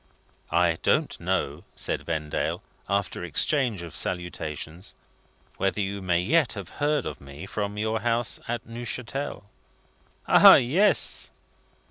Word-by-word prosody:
"I 85 -1 +2
don't - - +1
know," - - -2
said - - -2
Vendale, 80 -2 -2 0.3
after 100 -3 -1
exchange 115 - +1
of 85 - -9
salutations, 85 -1 -4 0.6
"whether 95 +2 0
you 100 0 -2
may 90 -2 +1
yet 150 - +2
have 100 -5 -7
heard 145 -2 +1
of 75 -1 -6
me 70 +5 -9
from 100 +1 -4
your 110 +1 0
House 115 +1 0
at 120 -1 -3
Neuchatel?" 120 +4 -5 0.8
"Ah, - - +9
yes!" 170 +13 +2
100 Hz, 120 wpm, -26 LUFS, 85-120 Hz, 0.8 s, Ah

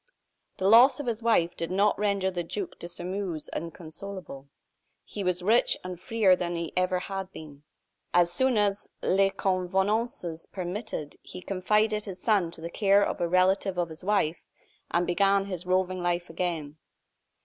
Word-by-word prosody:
The 190 - 0
loss 240 +7 +7
of 290 - -4
his 235 -2 -2
wife 200 -7 +2
did 165 - -4
not 200 +3 +2
render 200 -2 +1
the 175 -1 -2
Duc 185 +3 -5
de 170 - -7
Sairmeuse 180 -1 -5
inconsolable. 165 -3 -7 0.6
He 205 - -6
was 180 -1 0
free 220 +6 +5 0.2
and 180 -1 -7
richer 215 -5 +5
than 175 -1 -3
he 170 -1 -4
had 185 0 +2
ever 190 +1 -3
been. 150 -4 -11 0.5
As 175 0 +4
soon 260 -3 +2
as 205 -1 0
les 195 +1 +3
convenances 190 -1 -1
permitted, 180 -4 -5
he 180 - -10
confided 210 +3 +1
his 190 -3 -7
son 205 -7 +2
to 165 - -10
the 170 +1 -6
care 200 +1 +4
of - - -3
a 170 - +2
relative 185 +1 +2
of 175 -1 0
his 160 +2 -10
wife, 180 -5 +1 0.5
and 175 +1 +1
began 195 +2 +3
his 180 -2 -6
roving 185 0 +1
life 175 -1 -1
again. 165 -4 -3
185 Hz, 165 wpm, -27 LUFS, 175-200 Hz, 0.6 s, loss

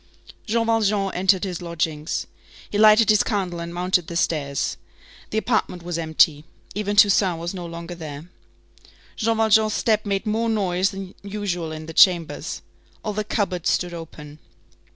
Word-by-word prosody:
Jean 230 +1 +1
Valjean 210 -3 +1
entered 190 0 +2
his 180 -3 -4
lodgings. 160 -2 -2 0.4
He 205 - -2
lighted 215 +1 +6
his 210 - +4
candle 185 -5 -2
and 170 0 -5
mounted 180 0 0
the 170 - -6
stairs. 145 -5 -1 0.5
The 220 - -3
apartment 220 -6 -1
was 175 -1 -3
empty. 160 -2 +3 0.3
Even 205 0 -2
Toussaint 195 -3 +5
was 170 +2 -4
no 175 -2 -6
longer 170 +1 -7
there. 155 -2 -8 0.9
Jean 225 0 0
Valjean's 220 -1 +4
step 215 -2 +1
made 200 -2 -2
more 225 +2 0
noise 190 -3 +1
than 195 -1 -8
usual 195 -5 -4
in 155 0 -7
the 165 - -8
chambers. 170 -2 +3 0.4
All 210 - -2
the 215 +1 -2
cupboards 200 -5 -1
stood 175 -1 0
open. 150 -3 -10
185 Hz, 155 wpm, -23 LUFS, 170-210 Hz, 0.9 s, lighted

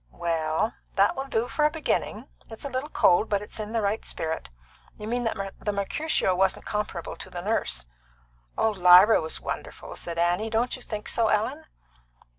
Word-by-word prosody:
"Well, 160 - -1 0.2
that 200 +1 +4
will 270 +1 -4
do 240 -3 0
for 300 - -1
a 300 - +5
beginning. 320 0 -2 0.2
It's 225 +4 -9
a - - -2
little 265 +3 -3
cold, 210 -5 +4
but 205 -1 0
it's 210 - -8
in 215 0 -4
the 225 -1 0
right 205 +2 0
spirit. 160 - -4 0.5
You 210 - -7
mean 245 +1 -1
that 195 -3 -2
the 210 - -1
Mercutio 200 +2 0
wasn't 190 +1 +1
comparable 210 -5 -3
to - - -8
the 175 - -6
Nurse." 65 - 0 0.7
"Oh, 220 - +3
Lyra 185 +2 +7
was 160 0 -2
wonderful!" - - -6
said 170 -1 -6
Annie. 175 +6 +1
"Don't 230 +3 0
you 255 - -11
think 215 -3 -6
so, 230 -1 +2
Ellen?" 255 +9 0
210 Hz, 185 wpm, -26 LUFS, 180-230 Hz, 0.7 s, Lyra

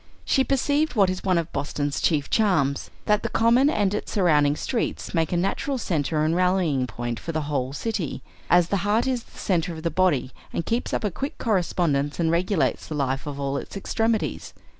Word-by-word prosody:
She 265 - +3
perceived 285 +1 +1
what 195 -4 +4
is 185 - -5
one 185 -2 +2
of 170 -1 -2
Boston's 145 0 -2
chief 150 -4 +1
charms, 160 -11 +1 0.2
that 210 0 +3
the - - -2
Common 240 +5 +4
and 205 -9 +1
its 210 - -3
surrounding 150 -7 +3
streets 235 - -3
make 165 -3 +1
a 175 - +1
natural 195 +9 -1
centre 155 - 0
and 160 +2 +1
rallying 180 -8 +2
point 120 +1 -4
for 165 - -5
the 155 -1 -2
whole 135 -3 -2
city; 180 - -3 0.3
as 175 -1 +4
the 200 - +1
heart 205 +5 +1
is 255 -2 0
the - - -20
centre 175 -2 0
of 160 -1 -8
the 170 - 0
body 155 -7 +1 0.2
and 170 - -3
keeps 230 +2 -1
up - - -1
a 210 - 0
quick 275 - -5
correspondence 170 - 0
and 165 -1 +2
regulates 175 +1 0
the 155 - -4
life 135 -1 -1
of 140 -1 -5
all 140 0 -1
its - - -6
extremities. 225 +2 -1
175 Hz, 205 wpm, -24 LUFS, 145-210 Hz, 0.3 s, what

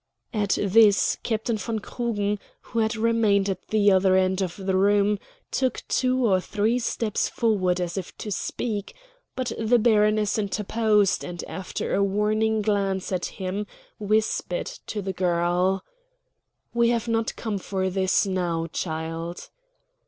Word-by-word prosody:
At 205 -3 +1
this 205 0 +4
Captain 220 0 -1
von 225 +1 -2
Krugen, 210 -2 -2 0.2
who 230 - -4
had 220 +1 +1
remained 220 -3 +2
at 190 -2 -4
the 205 -2 +4
other 190 0 +4
end 190 0 +2
of 180 -2 -2
the 190 -1 -1
room, 205 +1 +3 0.3
took 260 -2 0
two 255 -1 +1
or 190 -4 +3
three 215 +5 0
steps 230 -2 -1
forward 190 -6 +1
as 175 +1 -2
if 185 - -9
to 210 - -6
speak; 205 - -3 0.4
but 255 -1 -2
the 225 +2 +3
baroness 215 -2 +3
interposed, 210 -1 +1
and 175 -1 -6
after 190 -1 -4
a 200 - +3
warning 215 +2 +1
glance 195 -3 0
at 180 -2 -1
him 195 +2 -3 0.3
whispered 215 -3 0 0.2
to 210 -1 -4
the 190 0 -3
girl: 180 +1 +1 0.9
"We 235 0 +3
have 235 -1 0
not 225 -1 0
come 215 -4 -3
for 190 0 -2
this 190 +1 +2
now, 175 -4 -1
child." 165 +1 -4
205 Hz, 145 wpm, -25 LUFS, 190-220 Hz, 0.9 s, this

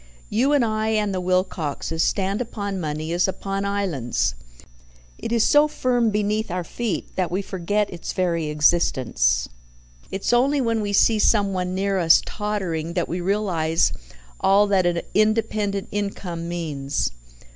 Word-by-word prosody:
You 245 +7 +2
and 285 -5 +3
I 215 0 -1
and 210 -2 +1
the 185 - -2
Wilcoxes 170 -4 -1
stand 195 +4 0
upon 200 -5 -4
money 155 +1 -3
as 175 +2 +2
upon 195 +1 -3
islands. 175 - -1 0.9
It - - -5
is 230 -2 +3
so 295 +1 +5
firm 245 -5 +1
beneath 210 +1 -1
our 180 0 -2
feet 230 +3 -4
that 185 -2 0
we 185 +4 -2
forget 200 +3 -1
its 170 - -5
very 170 -4 0
existence. 130 - +2 0.6
It's 195 +4 -1
only 275 +4 +3
when 230 -3 0
we 205 -1 -2
see 215 +2 +4
someone 195 -4 +1
near 195 0 0
us 165 -2 +5
tottering 180 -6 -3
that 175 - 0
we 175 +1 -3
realize 175 -4 +1 0.5
all 200 +2 +4
that 195 -3 +2
an 170 -1 0
independent 215 -2 +1
income 185 -4 -4
means. 145 - -2
195 Hz, 145 wpm, -23 LUFS, 170-210 Hz, 0.9 s, so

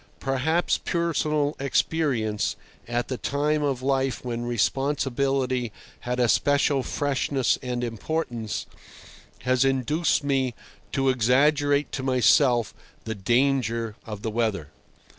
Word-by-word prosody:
Perhaps 140 +6 +1
personal 155 -4 0
experience, 130 -7 0 0.3
at 120 +2 -2
a 130 - -1
time 150 +4 0
of 135 -3 -1
life 135 -1 0
when 120 -1 -3
responsibility 135 0 0 0.3
had 125 +1 -3
a 120 - +4
special 145 +2 +2
freshness 135 -1 0
and 125 -1 -3
importance, 120 -1 -3 0.8
has 130 0 +3
induced 140 +5 +1
me 135 -4 0 0.4
to 135 -1 +1
exaggerate 145 +4 +2
to 135 - -3
myself 125 -2 +3 0.3
the 110 - -3
danger 115 0 +1
of 105 -2 -8
the 110 - -2
weather. 105 -9 -1
130 Hz, 110 wpm, -25 LUFS, 120-145 Hz, 0.8 s, a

